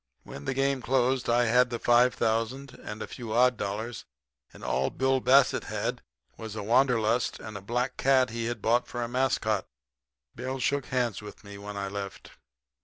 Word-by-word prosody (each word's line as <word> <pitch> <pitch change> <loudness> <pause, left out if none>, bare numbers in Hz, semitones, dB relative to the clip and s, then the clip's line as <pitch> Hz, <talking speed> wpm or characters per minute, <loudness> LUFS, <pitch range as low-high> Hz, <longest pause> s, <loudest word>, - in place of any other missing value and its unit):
"When 70 - -9
the - - -2
game 135 0 +1
closed 130 0 +1
I 120 +1 +4
had 125 +2 +4
the 120 - -3
five 120 +2 +4
thousand 115 +5 -1
and 105 +1 -7
a - - -7
few 115 -4 -6
odd 125 +1 +4
dollars, 110 +3 -4 0.5
and - - -14
all 65 +1 0
Bill 130 0 +1
Bassett 135 +1 +4
had - - -3 0.4
was 110 -1 -7
the 105 - -4
wanderlust 120 0 +2
and 110 -1 -8
a 100 - -6
black 125 +5 -2
cat 130 -2 +3
he 115 0 -3
had 115 -2 -4
bought 120 +2 +2
for 120 -1 -4
a - - -2
mascot. 120 -5 0 0.7
Bill 130 +1 -4
shook 140 0 0
hands 120 -5 -1
with 105 - -11
me 100 -1 -10
when 100 0 -7
I 100 0 -2
left. 100 0 -7
120 Hz, 185 wpm, -28 LUFS, 110-130 Hz, 0.7 s, I